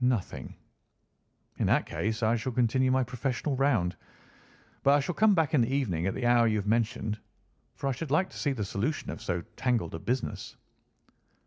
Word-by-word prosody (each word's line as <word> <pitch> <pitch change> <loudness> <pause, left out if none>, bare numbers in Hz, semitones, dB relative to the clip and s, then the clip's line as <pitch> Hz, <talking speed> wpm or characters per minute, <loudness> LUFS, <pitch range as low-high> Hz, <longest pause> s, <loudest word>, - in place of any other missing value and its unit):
"Nothing." 125 -6 -1 1.0
"In - - +2
that - - +3
case 110 +2 -2
I 110 +2 +3
shall 120 +2 -3
continue 130 +2 +2
my 130 0 +3
professional 130 +3 -2
round. 115 -10 +2 0.9
But 140 +1 +5
I - - +4
shall 145 +5 -2
come 210 +3 +4
back 160 -4 +1
in 140 - +5
the 120 +2 +1
evening 95 - 0
at 95 - -1
the 130 - -2
hour 120 -1 +5
you 110 -1 +2
have 100 - -2
mentioned, 110 -1 0 0.6
for - - -6
I - - +2
should 140 +4 -4
like 185 +7 +2
to - - -9
see 145 - +1
the 110 -6 -3
solution 110 +11 -2
of - - -8
so 85 -1 -2
tangled 120 -10 0
a 80 - -4
business." 125 +9 -3
125 Hz, 195 wpm, -29 LUFS, 110-135 Hz, 1.0 s, But